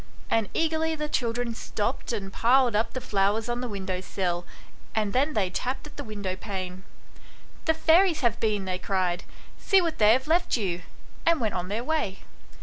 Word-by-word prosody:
And 225 -3 +2
eagerly 320 0 +1
the 300 -1 -3
children 240 -3 -1
stopped 225 +2 -3
and 195 -4 -4
piled 245 -1 +4
up 220 +2 +1
the 255 - -2
flowers 210 0 +1
on 240 0 -2
the 250 - -2
window 190 -4 -3
sill, 175 -2 -2 0.5
and 215 -2 0
then 285 +4 +2
they 190 -4 +1
tapped 255 +9 -2
at 300 - -12
the 285 - -5
window 205 -5 -4
pane. 185 -2 -5 0.4
" - - -24
The 320 - +3
fairies 330 +1 +4
have 235 -4 +1
been/' 210 -3 0
they 185 -1 -2
cried; 185 -1 -1 0.2
" - - -24
see 390 - +5
what 335 -3 -1
they 215 0 +7
have 260 +2 +1
left 335 -1 +2
you 180 -5 -2 0.2
;" - - -23
and 335 -2 +5
went 220 -4 0
on 180 0 -2
their 215 +5 -2
way. 295 -10 -1
225 Hz, 200 wpm, -27 LUFS, 195-285 Hz, 0.5 s, they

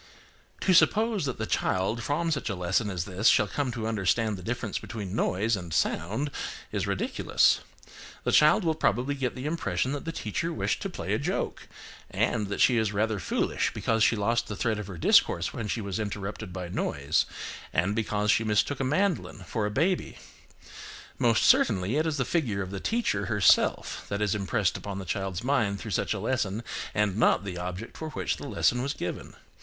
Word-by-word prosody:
To 185 - +3
suppose 215 0 +4
that 130 - -3
the 110 - -2
child 100 +3 0
from 165 +6 -1
such 140 -6 -1
a 100 - -2
lesson 90 +5 0
as 90 -3 -3
this 100 +3 0
shall - - +6
come 140 -3 -2
to 115 -2 -4
understand 110 0 +1
the 95 - -9
difference 115 +2 -3
between 105 -4 -6
noise 110 +2 +1
and 90 -4 -7
sound 110 - 0 0.4
is - - -1
ridiculous. - - +2 0.6
The - - 0
child 155 +7 +5
will 165 -2 +2
probably 145 -3 +1
get 135 -3 -2
the 130 +1 -6
impression 130 - -1
that 145 -1 -4
the 165 - -2
teacher 165 +4 -3
wished 105 -7 -1
to - - -3
play - - -3
a - - +1
joke, - - -3 0.4
and 110 -4 0
that 100 - -3
she 125 - +5
is 110 -2 +1
rather 110 0 0
foolish, - - 0
because 115 -1 +1
she 115 - +4
lost 115 +3 0
the 105 - -4
thread 110 +1 0
of 105 - -6
her 95 -4 -7
discourse 80 - +3
when 115 - -4
she 110 - -2
was 100 +1 -3
interrupted 105 -1 -4
by 90 -1 -5
noise, 85 - 0 0.4
and 90 +7 +1
because 105 -2 +1
she 115 - +3
mistook 110 +6 +1
a - - 0
mandolin 155 - 0
for 105 +4 -2
a - - -2
baby. 165 - 0 1.0
Most 115 -2 +3
certainly, 100 +1 +4
it 155 +1 +1
is 155 -2 -1
the 130 - 0
figure 115 - 0
of 95 - -8
the 100 - -4
teacher 235 - 0
herself 105 -4 +3
that 100 - -2
is 105 -1 +1
impressed 100 -5 0
upon 100 -1 -6
the 95 - -5
child's 95 0 -3
mind 115 -7 +1
through 110 - -6
such 105 - 0
a - - -4
lesson, 110 -1 -1 0.3
and 105 -2 +1
not 110 - +3
the 90 -3 -5
object 90 +5 -6
for 160 - -5
which - - -2
the - - -7
lesson 125 - +1
was 140 +2 -1
given. 90 - -5
110 Hz, 200 wpm, -28 LUFS, 100-130 Hz, 1.0 s, shall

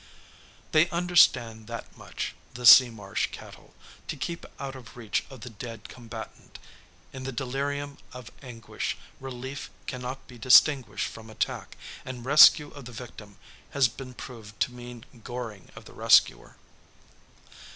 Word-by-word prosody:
They 160 +3 +4
understand 150 -11 +3
that 115 -1 -8
much, - - -6 0.2
the 125 0 -5
sea 125 +1 +10
marsh 105 -4 -3
cattle, - - -13 0.3
to - - -5
keep 170 -1 -5
out 135 -1 -6
of 125 -2 -13
reach 110 -3 -2
of 135 -4 -12
the 120 - -8
dead 115 0 -9
combatant. 115 -2 -10 0.6
In 130 - -7
the 135 - -4
delirium 140 +3 -4
of 125 -2 -10
anguish, 115 -5 -5 0.2
relief 130 +1 -7 0.2
cannot 130 +1 -6
be 125 -1 -13
distinguished 130 +2 +4
from 110 0 -11
attack, 110 - -4 0.3
and 125 -2 -8
rescue 150 +1 +7
of 140 -3 -11
the 125 - -9
victim 110 -4 -11 0.4
has 135 -3 +5
been 130 +2 -10
proved 110 -6 -11
to - - +1
mean 120 -1 -10 0.2
goring 115 -5 -7
of - - -12
the - - -14
rescuer. - - +3
125 Hz, 140 wpm, -27 LUFS, 115-135 Hz, 0.6 s, sea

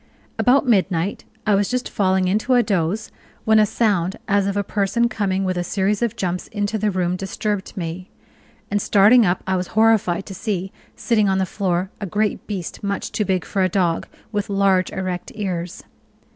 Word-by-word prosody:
About 265 +2 +4
midnight, 190 -4 +1 0.2
I 210 - +3
was 200 0 +2
just 250 0 -1
falling 190 -3 +1
into 215 +7 +2
a 245 - +5
doze 200 0 -1 0.3
when 220 0 +5
a 215 - +4
sound 195 -5 0
as 200 -1 +2
of 200 0 -1
a 200 - +1
person 210 +4 +1
coming 195 -4 -1
with 185 -1 -1
a - - -1
series 200 +3 0
of 235 -2 0
jumps 180 -4 -3
into 205 +1 -2
the 210 +1 +1
room 180 -2 0
disturbed 195 +1 -3
me; 180 +2 -5 0.6
and 205 0 +1
starting 210 +3 +5
up 175 +1 0
I 190 - 0
was 180 -1 -2
horrified 215 -5 +3
to 195 - -8
see, 190 -1 -3 0.2
sitting 215 -4 +1
on 190 - +2
the 190 - +1
floor, 185 0 -1
a 200 - -3
great 210 +2 -1
beast 195 -3 -5
much 200 -1 -2
too 210 - -1
big 185 -3 0
for 195 - -1
a 185 - +2
dog, 175 -3 0 0.2
with 205 -2 -2
large, 195 -2 +2
erect 185 -2 -4
ears. 180 -5 -4
195 Hz, 190 wpm, -21 LUFS, 185-210 Hz, 0.6 s, a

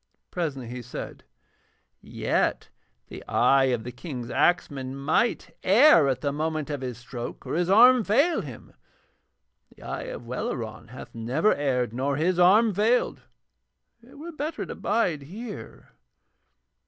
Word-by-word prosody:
Presently 145 -8 -3
he 125 +1 -6
said: - - -8 0.8
'Yet - - -1 0.4
the - - -9
eye 135 -1 +4
of 125 -4 0
the 125 - -6
King's 125 -2 -7
axeman 135 -6 0
might 165 - 0
err 200 - +6
at 130 -2 -1
the 140 - -1
moment 155 0 -3
of 145 -2 -4
his 125 -3 -5
stroke 120 0 -8
or - - -4
his 175 +1 0
arm 240 +4 +7
fail 280 - +2
him, 130 - -10 1.0
and - - -24
the - - -15
eye - - -5
of 120 - -8
Welleran 115 -2 -5
hath 125 +4 -11
never 125 - +1
erred 125 -5 -1
nor 135 +3 -1
his 175 +3 +1
arm 205 +5 +5
failed. 220 +6 +1 0.8
It 240 +4 -17
were 330 +4 -8
better 310 0 -4
to - - -7
bide 190 -9 0
here.' 205 - -9
150 Hz, 145 wpm, -26 LUFS, 130-210 Hz, 1.0 s, arm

